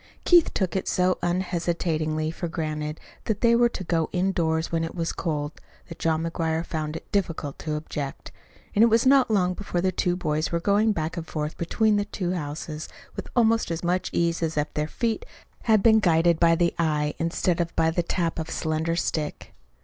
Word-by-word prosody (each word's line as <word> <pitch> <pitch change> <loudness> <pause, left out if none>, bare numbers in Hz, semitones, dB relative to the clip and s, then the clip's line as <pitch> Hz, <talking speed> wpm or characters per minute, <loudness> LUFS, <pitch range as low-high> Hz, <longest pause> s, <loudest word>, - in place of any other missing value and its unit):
Keith 345 -2 +6
took 190 -2 0
it 190 - -1
so 185 0 +2
unhesitatingly 170 -3 -1
for 170 +1 -4
granted 155 -2 -3 0.3
that 220 - -1
they 235 -1 +5
were 240 0 +4
to 205 - -6
go 165 -2 0
indoors 170 -4 0
when 165 -1 0
it 165 - -5
was 165 -2 -2
cold 150 -3 -3 0.3
that 165 - -9
John 160 0 +1
McGuire 165 0 -1
found 155 -2 -3
it - - -9
difficult 165 -7 -2
to 155 -2 -3
object; 150 -2 -5 0.4
and 205 - +3
it - - +7
was 230 +1 +3
not 270 -1 +5
long 185 -4 +2
before 180 -2 -3
the 185 +1 +1
two 175 0 0
boys 155 -3 -1
were 170 - +1
going 205 +5 +3
back 165 -2 -3
and 165 -1 -5
forth 150 0 -3
between 210 +5 +1
the 205 - 0
two 185 -3 -3
houses 155 -1 -5 0.3
with - - -6
almost 230 -2 +3
as 165 0 -3
much 180 +1 0
ease 170 0 0
as 160 -2 -1
if 150 +1 -1
their 150 0 -1
feet 225 +5 -2 0.4
had 215 -3 +4
been 220 -1 +6
guided 170 -3 +3
by 165 -1 +5
the 170 0 +1
eye 150 -2 +1
instead 170 +1 0
of 170 0 -4
by 160 0 +3
the 175 - +1
tap 170 -1 -1
of 160 0 -4
a - - -7
slender 160 +1 -1
stick. 155 -3 -3
170 Hz, 205 wpm, -25 LUFS, 160-185 Hz, 0.4 s, it